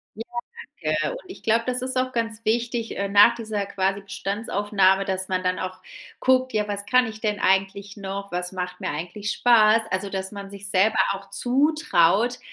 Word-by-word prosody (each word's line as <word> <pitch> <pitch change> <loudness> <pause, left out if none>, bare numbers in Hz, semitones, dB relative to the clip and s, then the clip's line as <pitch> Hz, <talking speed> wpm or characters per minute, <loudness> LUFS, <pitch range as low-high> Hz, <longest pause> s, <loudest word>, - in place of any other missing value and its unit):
Ja. 225 - -6 0.6
Ja, 155 0 0
ja, 150 - 0
und - - -5
ich 375 - -11
glaube 230 +1 +2
das 250 0 -1
ist 260 0 -3
auch 255 0 0
ganz 230 -1 -3
wichtig, 230 +1 -1
äh, 200 0 -1
nach 205 +4 +7
dieser 215 -3 -3
quasi 195 0 -1
Bestandsaufnahme, 195 -1 0
dass 190 0 -3
man 185 -1 -1
dann 180 0 0
auch 185 0 -5 0.4
guckt: 255 0 +2
„Ja 210 -1 0
was 205 0 -3
kann 250 +1 +4
ich 215 -1 -8
denn 210 -2 -1
eigentlich 195 +2 0
noch? 200 0 -6
Was 180 +1 -3
macht 180 -1 -5
mir - - -2
eigentlich 180 +7 -4
Spaß?“ 225 -2 +5
Also, 190 +1 -2
dass 190 +1 -4
man 200 -1 -8
sich 200 0 -8
selber 205 +4 +3
auch 195 0 -9
zutraut 245 - +2
205 Hz, 190 wpm, -24 LUFS, 190-230 Hz, 0.6 s, nach